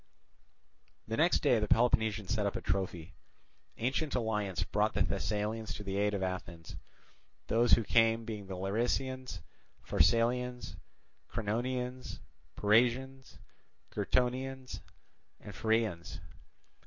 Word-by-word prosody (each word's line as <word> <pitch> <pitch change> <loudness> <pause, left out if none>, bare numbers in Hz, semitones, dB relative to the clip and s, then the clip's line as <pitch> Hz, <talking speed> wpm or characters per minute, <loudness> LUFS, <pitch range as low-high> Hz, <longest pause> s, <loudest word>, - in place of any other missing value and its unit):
The 110 - -2
next 165 +6 +3
day 125 -6 +4
the 105 - -1
Peloponnesians 110 -3 +2
set 105 -3 +1
up 100 - -3
a - - -3
trophy. 90 -3 -2 0.6
Ancient 135 +5 -1
alliance 105 -6 -1
brought - - 0
the - - +3
Thessalians 110 +1 -2
to 105 - -7
the 95 0 -3
aid 105 0 +2
of 95 - -2
Athens; 85 -3 -5 0.7
those 120 +2 +3
who 115 - +6
came 115 +1 +3
being 105 -4 -6
the 95 -1 -5
Larisaeans, 120 +2 -2 0.4
Pharsalians, 125 +7 +1 0.6
Cranonians, 125 +4 -2 0.4
Pyrasians, 125 +5 +2 0.5
Gyrtonians, 130 +4 -1 0.6
and 100 - -10
Pheraeans. 110 -7 -1
110 Hz, 110 wpm, -32 LUFS, 100-125 Hz, 0.7 s, who